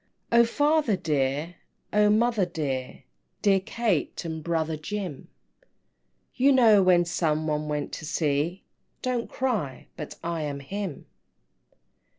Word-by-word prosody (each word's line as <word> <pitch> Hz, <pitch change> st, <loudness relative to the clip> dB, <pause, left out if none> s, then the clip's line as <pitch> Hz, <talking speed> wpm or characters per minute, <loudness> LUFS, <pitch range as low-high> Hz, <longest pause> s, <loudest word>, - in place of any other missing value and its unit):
III. 235 Hz, -, +7 dB
"O -, -, +5 dB
father 290 Hz, -1 st, +2 dB
dear, 150 Hz, +1 st, -1 dB, 0.4 s
O 210 Hz, 0 st, +5 dB
mother 225 Hz, 0 st, +3 dB
dear, 140 Hz, -6 st, -4 dB, 0.4 s
Dear 195 Hz, -2 st, +5 dB
Kate, 205 Hz, -5 st, -1 dB
and 160 Hz, -1 st, -4 dB
brother 160 Hz, -1 st, -1 dB
Jim 170 Hz, -2 st, -5 dB, 1.1 s
You 270 Hz, +2 st, +4 dB
know 225 Hz, -6 st, +6 dB
when 180 Hz, -2 st, +4 dB
some 160 Hz, -2 st, 0 dB
one 150 Hz, -1 st, -1 dB
went 150 Hz, -1 st, -2 dB
to 160 Hz, -, -6 dB
sea 155 Hz, +3 st, 0 dB, 0.4 s
Don't 250 Hz, -2 st, -1 dB
cry 210 Hz, -, -2 dB
but 150 Hz, -, -6 dB
I 170 Hz, -1 st, -2 dB
am 145 Hz, -2 st, -3 dB
him!" 190 Hz, +2 st, -5 dB
170 Hz, 130 wpm, -26 LUFS, 150-210 Hz, 1.1 s, III